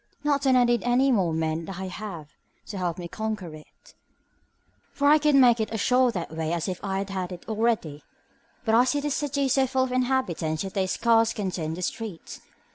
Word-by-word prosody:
Not 285 Hz, -2 st, +1 dB
that 265 Hz, -2 st, +3 dB
I 250 Hz, -, +5 dB
need 240 Hz, -1 st, +2 dB
any 255 Hz, +3 st, +2 dB
more 190 Hz, -8 st, +2 dB
men 160 Hz, 0 st, -2 dB
than 195 Hz, -, -7 dB
I 190 Hz, +1 st, -5 dB
have 180 Hz, -6 st, -7 dB, 0.4 s
to 200 Hz, -, -6 dB
help 175 Hz, -2 st, -2 dB
me 175 Hz, -, -6 dB
to 170 Hz, -, -10 dB
conquer 215 Hz, -7 st, -4 dB
it, 155 Hz, 0 st, -16 dB, 1.0 s
for 285 Hz, -, 0 dB
I 305 Hz, +1 st, +6 dB
could 300 Hz, -1 st, +3 dB
make 245 Hz, -3 st, +6 dB
it 215 Hz, -1 st, -1 dB
as 220 Hz, -, -4 dB
sure 250 Hz, +3 st, +3 dB
that 170 Hz, -5 st, -5 dB
way 160 Hz, 0 st, -2 dB
as 170 Hz, +1 st, -2 dB
if 185 Hz, -2 st, -5 dB
I 195 Hz, 0 st, -2 dB
had 190 Hz, -2 st, -4 dB
it 175 Hz, -1 st, -9 dB
already; 220 Hz, -9 st, -1 dB, 0.6 s
but 220 Hz, -, +1 dB
I 235 Hz, +2 st, +6 dB
see 285 Hz, +3 st, 0 dB
this 290 Hz, -1 st, -2 dB
city 285 Hz, -1 st, -1 dB
is 265 Hz, -, +2 dB
so 265 Hz, -1 st, +3 dB
full 260 Hz, 0 st, +1 dB
of 260 Hz, -, -3 dB
inhabitants 245 Hz, -12 st, 0 dB
that 195 Hz, -, -6 dB
they 190 Hz, -2 st, 0 dB
scarce 225 Hz, +3 st, +2 dB
can 200 Hz, -4 st, -3 dB
turn 170 Hz, -3 st, -4 dB
in 155 Hz, -, -3 dB
the 180 Hz, -, -6 dB
streets. 210 Hz, -3 st, -6 dB
215 Hz, 230 wpm, -26 LUFS, 175-255 Hz, 1.0 s, I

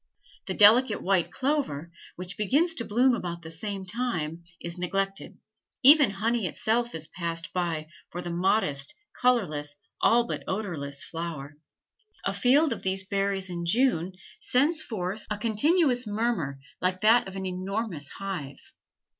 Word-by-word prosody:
The 190 Hz, -, -2 dB
delicate 220 Hz, +2 st, +6 dB
white 185 Hz, -3 st, +2 dB
clover, 255 Hz, -, -2 dB, 0.2 s
which 180 Hz, +1 st, -6 dB
begins 285 Hz, -, +2 dB
to 235 Hz, -8 st, -4 dB
bloom 250 Hz, +4 st, +3 dB
about 170 Hz, -6 st, -4 dB
the 160 Hz, -, -8 dB
same 195 Hz, +3 st, -5 dB
time, 180 Hz, -7 st, -3 dB, 0.2 s
is 170 Hz, +1 st, -4 dB
neglected; 195 Hz, +2 st, -2 dB, 0.5 s
even 290 Hz, -1 st, +9 dB
honey 215 Hz, +1 st, -1 dB
itself 235 Hz, +6 st, -1 dB
is 160 Hz, -1 st, -2 dB
passed 170 Hz, +1 st, -5 dB
by 165 Hz, -4 st, -2 dB, 0.2 s
for 175 Hz, -, -6 dB
this 175 Hz, -1 st, -4 dB
modest 170 Hz, -6 st, +1 dB, 0.3 s
colorless, 155 Hz, -13 st, +1 dB, 0.3 s
all 240 Hz, +1 st, +5 dB
but -, -, -4 dB
odorless 160 Hz, -9 st, -3 dB
flower. 160 Hz, -4 st, -6 dB, 0.7 s
A -, -, 0 dB
field 275 Hz, +3 st, +3 dB
of -, -, -8 dB
these 190 Hz, 0 st, 0 dB
berries 195 Hz, -1 st, 0 dB
in 175 Hz, -1 st, -4 dB
June 185 Hz, -2 st, +2 dB, 0.3 s
sends 305 Hz, +6 st, +2 dB
forth 210 Hz, -5 st, -4 dB
a 210 Hz, -, -2 dB
continuous 245 Hz, -, +2 dB
murmur 205 Hz, -10 st, -1 dB, 0.2 s
like 185 Hz, 0 st, -1 dB
that 225 Hz, +1 st, +5 dB
of 190 Hz, -, -9 dB
an 190 Hz, 0 st, -4 dB
enormous 185 Hz, -4 st, -3 dB
hive. 175 Hz, -9 st, -7 dB
195 Hz, 145 wpm, -27 LUFS, 170-235 Hz, 0.7 s, even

